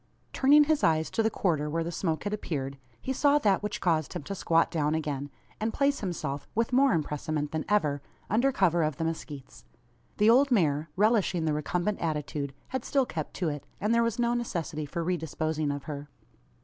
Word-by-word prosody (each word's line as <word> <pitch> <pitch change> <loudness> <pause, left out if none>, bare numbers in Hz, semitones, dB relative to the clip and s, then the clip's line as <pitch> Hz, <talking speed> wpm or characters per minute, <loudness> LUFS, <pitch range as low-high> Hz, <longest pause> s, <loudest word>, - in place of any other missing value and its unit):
Turning 290 +3 +6
his 310 0 +1
eyes 160 -1 +2
to - - +1
the 220 - +2
quarter 155 -8 0
where 165 +2 -1
the 170 - -4
smoke 160 -3 -2
had 205 - -2
appeared, 140 -9 -4 0.2
he 265 - -3
saw 285 +2 +4
that 205 -9 +2
which 210 0 -3
caused 160 -4 0
him - - -5
to 195 - -5
squat 165 -3 +2
down 155 -2 +1
again; 145 -3 -3 0.3
and 220 +1 -2
place 280 0 +2
himself, 150 -7 -4
with 230 +2 0
more 270 0 +5
impressement 150 -1 -2
than 160 -1 -2
ever, 150 -9 +2 0.3
under 240 +7 +2
cover 175 -7 +2
of 155 -3 0
the - - -2
mezquites. 145 - -6 0.5
The 210 - +4
old 260 +5 +6
mare, 160 - +2
relishing 200 -5 +2
the 155 - +1
recumbent 175 +6 -1
attitude, 150 -3 -2 0.2
had 260 -2 -3
still 275 -2 +1
kept 155 -9 -5
to 175 -4 -1
it; 145 -1 -5 0.2
and 210 +3 +1
there 235 - +4
was 230 -2 0
no 240 0 +1
necessity 165 -10 -3
for 170 +4 -3
re 180 +1 0
disposing 155 -1 -2
of 145 -1 -3
her. 145 -1 -7
165 Hz, 200 wpm, -28 LUFS, 150-220 Hz, 0.5 s, Turning